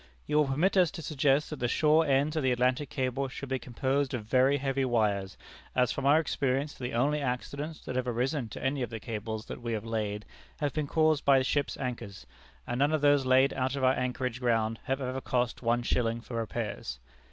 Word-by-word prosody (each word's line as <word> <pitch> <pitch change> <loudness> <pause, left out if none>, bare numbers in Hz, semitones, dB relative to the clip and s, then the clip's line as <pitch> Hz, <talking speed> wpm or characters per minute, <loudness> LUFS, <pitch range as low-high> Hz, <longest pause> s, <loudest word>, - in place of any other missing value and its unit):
"You 150 - 0
will 150 -2 +4
permit 165 +9 +1
us 180 -3 +5
to 170 -4 -7
suggest 145 0 +1
that 150 - -5
the 120 - 0
shore 155 +5 +3
ends 140 +3 +2
of 155 - +1
the 130 -2 +2
Atlantic 125 +3 +1
Cable 130 0 -1
should 135 +1 -7
be 130 0 -1
composed 130 +2 -1
of 110 -4 -5
very 130 +5 +3
heavy 135 0 -1
wires, 105 -6 0 0.4
as 125 -1 +3
from 140 0 -2
our 150 +3 +6
experience 140 -2 -1
the 125 -1 -5
only 145 +5 +1
accidents 140 +4 -3
that 130 - -4
have 130 0 -1
arisen 125 +1 -1
to - - -8
any 135 +1 0
of 125 - -2
the 115 -1 -6
cables 110 0 -5
that - - -8
we 120 -1 -3
have 110 0 -3
laid 105 -2 -3 0.3
have 145 -2 -1
been 155 -2 -1
caused 155 -1 +2
by 140 -1 +5
ships' 140 +2 0
anchors, 120 -6 -5 0.4
and 120 +1 -3
none 145 +3 +3
of 155 - +1
those 145 -2 +4
laid 130 +2 +5
out 130 0 -1
of 135 - -3
anchorage 125 -1 0
ground 115 -2 +1
have 135 +1 -1
ever 130 0 -3
cost 125 -1 -1
one 120 0 +1
shilling 115 -1 0
for 115 0 -7
repairs. 110 - -4
130 Hz, 215 wpm, -29 LUFS, 120-140 Hz, 0.4 s, our